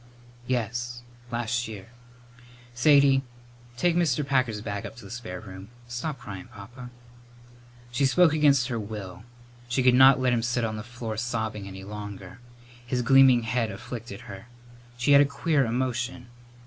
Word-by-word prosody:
"Yes; 120 Hz, 0 st, -2 dB, 0.3 s
last 120 Hz, 0 st, -2 dB
year. 105 Hz, -2 st, -9 dB, 0.8 s
Sadie, 140 Hz, +1 st, +5 dB, 0.6 s
take 175 Hz, +3 st, +2 dB
Mr. 155 Hz, -5 st, +1 dB
Packer's 130 Hz, -6 st, +1 dB
bag 100 Hz, -1 st, -5 dB
up -, -, -8 dB
to 115 Hz, -3 st, -12 dB
the 95 Hz, -, -11 dB
spare 110 Hz, -7 st, -6 dB
room. 95 Hz, -1 st, -11 dB, 0.2 s
Stop 120 Hz, +5 st, -4 dB
cryin', 95 Hz, -3 st, -9 dB
Papa." 120 Hz, +5 st, -11 dB, 1.0 s
She 135 Hz, +3 st, +2 dB
spoke 165 Hz, +3 st, +4 dB
against 140 Hz, -4 st, +3 dB
her 120 Hz, -2 st, -2 dB
will. 100 Hz, -3 st, -7 dB, 0.5 s
She 130 Hz, +1 st, +1 dB
could 125 Hz, -1 st, +5 dB
not 130 Hz, +1 st, +7 dB
let 130 Hz, -1 st, +2 dB
him 120 Hz, -, +1 dB
sit 120 Hz, 0 st, 0 dB
on 110 Hz, -1 st, -3 dB
the 110 Hz, -, -5 dB
floor 115 Hz, -1 st, -6 dB
sobbing 110 Hz, -3 st, -3 dB
any 95 Hz, 0 st, -9 dB
longer. 100 Hz, -1 st, -8 dB, 0.4 s
His 125 Hz, 0 st, -2 dB
gleaming 130 Hz, -1 st, +6 dB
head 115 Hz, 0 st, -1 dB
afflicted 115 Hz, +1 st, -8 dB
her. 115 Hz, -3 st, -10 dB, 0.5 s
She 125 Hz, +3 st, +1 dB
had 140 Hz, 0 st, +8 dB
a -, -, +5 dB
queer 140 Hz, 0 st, +1 dB
emotion. 125 Hz, +1 st, -2 dB
120 Hz, 155 wpm, -26 LUFS, 110-130 Hz, 1.0 s, had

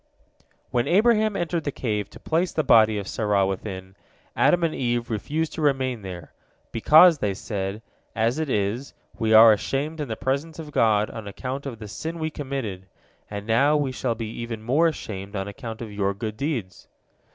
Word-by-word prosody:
When 120 Hz, -1 st, +1 dB
Abraham 215 Hz, +2 st, +3 dB
entered 170 Hz, -2 st, -1 dB
the 145 Hz, -, -2 dB
cave 105 Hz, -6 st, -2 dB
to -, -, -13 dB
place 170 Hz, +3 st, 0 dB
the 155 Hz, -, 0 dB
body 110 Hz, -4 st, +5 dB
of 100 Hz, -, -4 dB
Sarah 105 Hz, -3 st, +1 dB
within, 95 Hz, -1 st, -5 dB, 0.4 s
Adam 175 Hz, -1 st, +3 dB
and 165 Hz, -2 st, +1 dB
Eve 120 Hz, -2 st, -1 dB
refused 150 Hz, +9 st, -2 dB
to -, -, -5 dB
remain 130 Hz, -5 st, +1 dB
there, 90 Hz, -4 st, -8 dB, 0.4 s
"because," 155 Hz, +7 st, +6 dB
they 100 Hz, -2 st, -1 dB
said, 105 Hz, -1 st, -4 dB, 0.3 s
"as 115 Hz, +6 st, +1 dB
it 160 Hz, -2 st, -2 dB
is, 110 Hz, +5 st, -1 dB, 0.2 s
we 110 Hz, -1 st, +1 dB
are 110 Hz, 0 st, +9 dB
ashamed 145 Hz, +9 st, -2 dB
in 145 Hz, -, -3 dB
the 110 Hz, -, -3 dB
presence 140 Hz, +7 st, -2 dB
of 155 Hz, -2 st, -8 dB
God 110 Hz, -5 st, +2 dB
on 110 Hz, -2 st, -8 dB
account 130 Hz, +7 st, -5 dB
of 120 Hz, -4 st, -6 dB
the 110 Hz, -1 st, -9 dB
sin 160 Hz, -, -5 dB
we 160 Hz, -1 st, -2 dB
committed, 130 Hz, -11 st, -5 dB, 0.4 s
and 100 Hz, 0 st, -6 dB
now 140 Hz, +7 st, +3 dB
we 140 Hz, -3 st, -1 dB
shall 125 Hz, -2 st, -2 dB
be 115 Hz, 0 st, -4 dB
even 115 Hz, -2 st, -5 dB
more 145 Hz, +9 st, +3 dB
ashamed 100 Hz, -10 st, -5 dB
on 95 Hz, 0 st, -3 dB
account 115 Hz, 0 st, -7 dB
of 110 Hz, -, -8 dB
your 100 Hz, -1 st, -1 dB
good 110 Hz, +1 st, -4 dB
deeds." 130 Hz, -8 st, -4 dB
115 Hz, 185 wpm, -24 LUFS, 105-150 Hz, 0.4 s, are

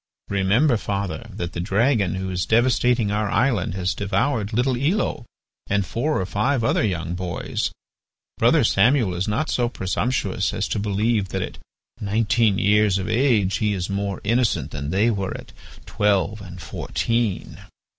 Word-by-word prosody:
Remember, 105 Hz, +8 st, +3 dB
father, 100 Hz, -6 st, -4 dB
that 85 Hz, 0 st, -5 dB
the -, -, -4 dB
dragon 100 Hz, 0 st, +1 dB
who 95 Hz, 0 st, -3 dB
is 90 Hz, 0 st, -2 dB
devastating 120 Hz, -1 st, +2 dB
our 105 Hz, 0 st, 0 dB
island 115 Hz, -9 st, +1 dB
has 90 Hz, -1 st, -1 dB
devoured 100 Hz, +2 st, -1 dB
little 125 Hz, +3 st, +1 dB
Elo 145 Hz, -, -1 dB, 0.4 s
and 100 Hz, -1 st, +1 dB
four 150 Hz, +10 st, -1 dB
or 95 Hz, -, -1 dB
five 115 Hz, +7 st, 0 dB
other 115 Hz, -, +2 dB
young 85 Hz, -5 st, -2 dB
boys. 90 Hz, -1 st, -3 dB, 0.7 s
Brother -, -, +4 dB
Samuel 115 Hz, -1 st, +3 dB
is 90 Hz, +3 st, -2 dB
not 120 Hz, +10 st, -1 dB
go 120 Hz, -1 st, +1 dB
presumptuous 120 Hz, +5 st, -1 dB
as -, -, -1 dB
to -, -, -1 dB
believe 105 Hz, 0 st, 0 dB
that -, -, -2 dB
at -, -, -8 dB, 0.4 s
nineteen 110 Hz, 0 st, +2 dB
years 105 Hz, 0 st, +3 dB
of 95 Hz, -, -3 dB
age 110 Hz, -5 st, +2 dB
he 105 Hz, -2 st, 0 dB
is 95 Hz, 0 st, -3 dB
more 100 Hz, 0 st, -2 dB
innocent 115 Hz, +2 st, +1 dB
than 70 Hz, -1 st, -4 dB
they 100 Hz, +7 st, +2 dB
were 100 Hz, -3 st, -3 dB
at -, -, -13 dB, 0.3 s
twelve 105 Hz, +1 st, 0 dB
and 90 Hz, -2 st, -9 dB
fourteen. 115 Hz, -5 st, -2 dB
105 Hz, 155 wpm, -23 LUFS, 95-120 Hz, 0.7 s, Brother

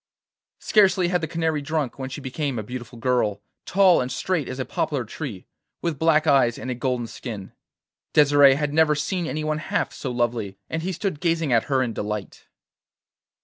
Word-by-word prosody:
Scarcely 190 Hz, -4 st, +4 dB
had 180 Hz, -1 st, +1 dB
the 160 Hz, -, -2 dB
canary 160 Hz, -2 st, -1 dB
drunk 145 Hz, -3 st, -2 dB
when 130 Hz, -1 st, -4 dB
she 140 Hz, -, -7 dB
became 135 Hz, 0 st, -3 dB
a 110 Hz, -, -3 dB
beautiful 120 Hz, +1 st, -8 dB
girl, 115 Hz, -4 st, 0 dB, 0.2 s
tall 190 Hz, -4 st, +5 dB
and 125 Hz, 0 st, -3 dB
straight 160 Hz, +2 st, -1 dB
as 130 Hz, -, -5 dB
a 130 Hz, -, -2 dB
poplar 140 Hz, -6 st, -2 dB
tree, 110 Hz, -, -7 dB, 0.4 s
with 165 Hz, -5 st, -2 dB
black 160 Hz, -1 st, +3 dB
eyes 135 Hz, -6 st, +4 dB
and 130 Hz, -, -5 dB
a -, -, 0 dB
golden 125 Hz, -1 st, -1 dB
skin. 110 Hz, -4 st, -7 dB, 0.6 s
Desire 145 Hz, -2 st, +6 dB
had 145 Hz, 0 st, -2 dB
never 155 Hz, -1 st, +4 dB
seen 175 Hz, +3 st, -2 dB
anyone 155 Hz, 0 st, -2 dB
half -, -, -2 dB
so 135 Hz, -, -5 dB
lovely, 120 Hz, -5 st, -1 dB
and 160 Hz, -, -1 dB
he 185 Hz, +3 st, -2 dB
stood 185 Hz, -3 st, -3 dB
gazing 165 Hz, -5 st, +1 dB
at 115 Hz, -, +3 dB
her 135 Hz, -2 st, +1 dB
in 120 Hz, -3 st, -3 dB
delight. 105 Hz, -1 st, -5 dB
140 Hz, 185 wpm, -24 LUFS, 120-160 Hz, 0.6 s, Desire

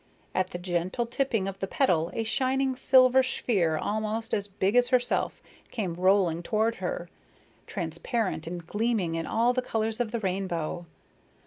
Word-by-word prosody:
At 185 Hz, 0 st, 0 dB
the -, -, -5 dB
gentle 180 Hz, +5 st, -1 dB
tipping 235 Hz, -4 st, -1 dB
of 195 Hz, 0 st, -5 dB
the 195 Hz, -, -2 dB
petal 175 Hz, -, +2 dB
a 225 Hz, -, 0 dB
shining 260 Hz, +3 st, +1 dB
silver 260 Hz, 0 st, +5 dB
sphere 195 Hz, -10 st, 0 dB
almost 215 Hz, +4 st, -2 dB
as 200 Hz, -1 st, 0 dB
big 195 Hz, +2 st, 0 dB
as 245 Hz, 0 st, +4 dB
herself, 255 Hz, -2 st, 0 dB, 0.3 s
came 195 Hz, -7 st, -3 dB
rolling 180 Hz, -1 st, +3 dB
toward 220 Hz, +5 st, 0 dB
her, -, -, -3 dB, 0.6 s
transparent 175 Hz, +1 st, -2 dB
and 170 Hz, 0 st, -6 dB
gleaming 210 Hz, -3 st, 0 dB
in 165 Hz, 0 st, -2 dB
all 235 Hz, +2 st, +2 dB
the 255 Hz, -, 0 dB
colors 225 Hz, -2 st, -2 dB
of 240 Hz, -2 st, 0 dB
the 235 Hz, +1 st, -2 dB
rainbow. 180 Hz, -4 st, -2 dB
210 Hz, 155 wpm, -28 LUFS, 180-240 Hz, 0.6 s, silver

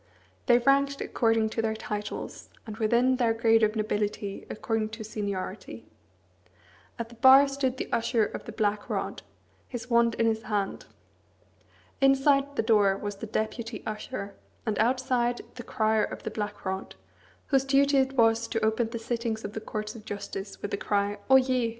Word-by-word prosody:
They 240 Hz, -2 st, +7 dB
ranked 275 Hz, +2 st, +2 dB
according 225 Hz, -1 st, +1 dB
to 225 Hz, -, -1 dB
their 220 Hz, -1 st, -1 dB
titles, 210 Hz, -1 st, -6 dB, 0.2 s
and 215 Hz, -2 st, -7 dB
within 240 Hz, +4 st, +3 dB
their 230 Hz, -3 st, +2 dB
grade 225 Hz, 0 st, +4 dB
of 215 Hz, 0 st, +2 dB
nobility 210 Hz, -2 st, -2 dB
according 220 Hz, 0 st, -2 dB
to 220 Hz, -, -6 dB
seniority. 200 Hz, -, -5 dB, 1.1 s
At 230 Hz, -1 st, -5 dB
the -, -, -13 dB
bar 270 Hz, +2 st, +8 dB
stood 270 Hz, -2 st, -1 dB
the -, -, -3 dB
Usher 230 Hz, -1 st, +2 dB
of -, -, -7 dB
the -, -, -7 dB
Black 205 Hz, -1 st, -1 dB
Rod, -, -, -3 dB, 0.5 s
his 245 Hz, 0 st, -7 dB
wand 235 Hz, 0 st, +4 dB
in 230 Hz, -, +1 dB
his 220 Hz, -1 st, +1 dB
hand. 205 Hz, -3 st, -3 dB, 1.1 s
Inside 275 Hz, +1 st, +3 dB
the 225 Hz, -, +1 dB
door 205 Hz, -4 st, +4 dB
was 205 Hz, 0 st, -5 dB
the 225 Hz, -, -6 dB
Deputy 220 Hz, +1 st, -3 dB
Usher; 215 Hz, -1 st, -5 dB, 0.3 s
and 215 Hz, -3 st, -1 dB
outside, 245 Hz, 0 st, +1 dB
the 245 Hz, -, -8 dB
Crier 220 Hz, -1 st, +1 dB
of -, -, -8 dB
the -, -, -4 dB
Black 210 Hz, -1 st, -5 dB
Rod, 190 Hz, +1 st, -4 dB, 0.5 s
whose 270 Hz, -2 st, +3 dB
duty 275 Hz, +1 st, +3 dB
it 265 Hz, 0 st, +1 dB
was 230 Hz, -2 st, +3 dB
to 225 Hz, -, -1 dB
open 220 Hz, +1 st, +1 dB
the 230 Hz, -, -4 dB
sittings 230 Hz, -1 st, -3 dB
of 205 Hz, -, -6 dB
the 220 Hz, -, -5 dB
Courts 215 Hz, 0 st, -5 dB
of 225 Hz, -, -11 dB
Justice 200 Hz, -1 st, -6 dB
with 205 Hz, -, -3 dB
the -, -, -1 dB
cry, 205 Hz, 0 st, -1 dB
"Oyez!" 255 Hz, -3 st, +4 dB
225 Hz, 170 wpm, -28 LUFS, 210-250 Hz, 1.1 s, bar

